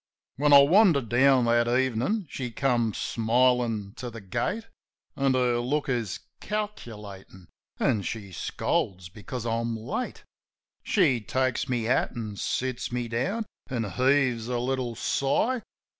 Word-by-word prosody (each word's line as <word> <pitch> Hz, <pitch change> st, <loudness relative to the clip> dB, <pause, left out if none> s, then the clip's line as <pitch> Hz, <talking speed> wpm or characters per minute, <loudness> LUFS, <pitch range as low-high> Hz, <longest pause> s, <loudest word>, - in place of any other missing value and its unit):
When 145 Hz, +2 st, +2 dB
I 140 Hz, -1 st, +10 dB
wander 175 Hz, -1 st, +5 dB
down 125 Hz, +2 st, +4 dB
that 120 Hz, 0 st, +3 dB
evenin', 130 Hz, -, +1 dB
she 130 Hz, -2 st, -5 dB
come 120 Hz, -2 st, +1 dB
smilin' 115 Hz, -2 st, +1 dB
to 125 Hz, -, -5 dB
the 115 Hz, -1 st, -9 dB
gate, 185 Hz, -, -2 dB, 0.5 s
An' 135 Hz, -1 st, +2 dB
her 125 Hz, -2 st, +2 dB
look 140 Hz, +4 st, -1 dB
is 115 Hz, -7 st, -2 dB, 0.2 s
calculatin', 105 Hz, -, -6 dB, 0.3 s
as 105 Hz, -3 st, +1 dB
she 105 Hz, -4 st, -6 dB
scolds 90 Hz, +1 st, -2 dB
because 110 Hz, +5 st, -7 dB
I'm 115 Hz, 0 st, -1 dB
late. 125 Hz, -, -4 dB, 0.6 s
She 145 Hz, -, +2 dB
takes 130 Hz, +3 st, -1 dB
my 125 Hz, -, +1 dB
hat 115 Hz, +3 st, +1 dB
an' 110 Hz, -3 st, -5 dB
sits 130 Hz, +3 st, -2 dB
me 120 Hz, -1 st, -2 dB
down 195 Hz, -, -1 dB, 0.2 s
an' 125 Hz, -4 st, -1 dB
heaves 130 Hz, -2 st, +2 dB
a 125 Hz, -1 st, -1 dB
little 125 Hz, -1 st, -2 dB
sigh. 220 Hz, -, 0 dB
125 Hz, 135 wpm, -27 LUFS, 115-135 Hz, 0.6 s, I